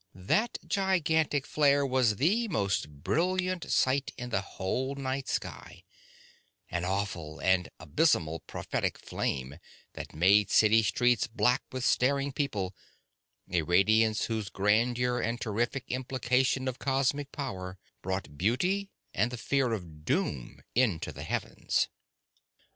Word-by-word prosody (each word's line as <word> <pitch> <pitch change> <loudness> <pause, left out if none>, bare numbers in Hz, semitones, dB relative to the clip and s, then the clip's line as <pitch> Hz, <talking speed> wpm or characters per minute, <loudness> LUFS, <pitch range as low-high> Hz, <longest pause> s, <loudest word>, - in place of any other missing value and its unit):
That 155 - 0
gigantic 160 -7 +1
flare 145 -1 +3
was 130 -5 +2
the 200 - +2
most 100 - 0
brilliant 180 - -1
sight 130 +1 +2
in 125 -1 -6
the 95 - +1
whole 125 +8 -3
night 135 0 -3
sky, - - -5 0.9
an 90 -1 -2
awful 90 -5 -3
and 95 -2 +2
abysmally 80 - +1
prophetic - - -2
flame 65 +4 -3 0.3
that - - -8
made 100 +5 +5
city 110 +1 +5
streets 120 +3 +2
black 125 +2 +2
with 130 -1 -3
staring 140 +3 +2
people, 105 -10 -2 0.8
a 90 -2 +2
radiance 110 +6 +3
whose 110 -4 -3
grandeur 120 +5 +1
and 120 0 -1
terrific 120 +5 -1
implication 130 +1 0
of 130 -1 -3
cosmic 135 +1 0
power 95 -9 -5 0.2
brought 95 -6 -4
beauty 180 - +1 0.2
and 115 +5 +1
the 125 - -6
fear 130 +1 +1
of 85 -8 -6
doom 65 -4 -2
into 110 -10 +1
the - - -9
heavens! - - -1
120 Hz, 125 wpm, -29 LUFS, 95-140 Hz, 0.9 s, made